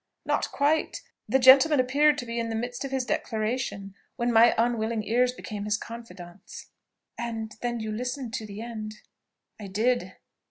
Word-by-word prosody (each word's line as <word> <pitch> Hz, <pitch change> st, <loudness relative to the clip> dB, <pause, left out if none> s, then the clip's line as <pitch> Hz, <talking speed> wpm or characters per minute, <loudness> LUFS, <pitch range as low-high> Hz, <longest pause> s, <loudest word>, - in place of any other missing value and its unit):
"Not -, -, 0 dB
quite. 295 Hz, +3 st, +1 dB, 0.3 s
The 265 Hz, -, +4 dB
gentleman 270 Hz, +3 st, +7 dB
appeared 285 Hz, +4 st, +3 dB
to 245 Hz, -, -4 dB
be 235 Hz, 0 st, -3 dB
in 230 Hz, 0 st, -2 dB
the 225 Hz, -, -3 dB
midst 245 Hz, +3 st, -4 dB
of 275 Hz, -, -4 dB
his 265 Hz, -1 st, -1 dB
declaration 215 Hz, -4 st, -2 dB, 0.2 s
when 240 Hz, 0 st, 0 dB
my 230 Hz, +1 st, +6 dB
unwilling 225 Hz, -1 st, 0 dB
ears 245 Hz, +4 st, +2 dB
became 215 Hz, -4 st, -7 dB
his 210 Hz, 0 st, +1 dB
confidants." 195 Hz, -6 st, -10 dB, 0.5 s
"And 225 Hz, -2 st, -4 dB
then 240 Hz, -1 st, -2 dB
you 220 Hz, -1 st, -4 dB
listened 245 Hz, +2 st, -4 dB
to 220 Hz, -, -4 dB
the 205 Hz, +1 st, -8 dB
end?" 215 Hz, -2 st, -6 dB, 0.6 s
"I 205 Hz, -, -7 dB
did." 215 Hz, -1 st, 0 dB
235 Hz, 165 wpm, -27 LUFS, 215-250 Hz, 0.6 s, gentleman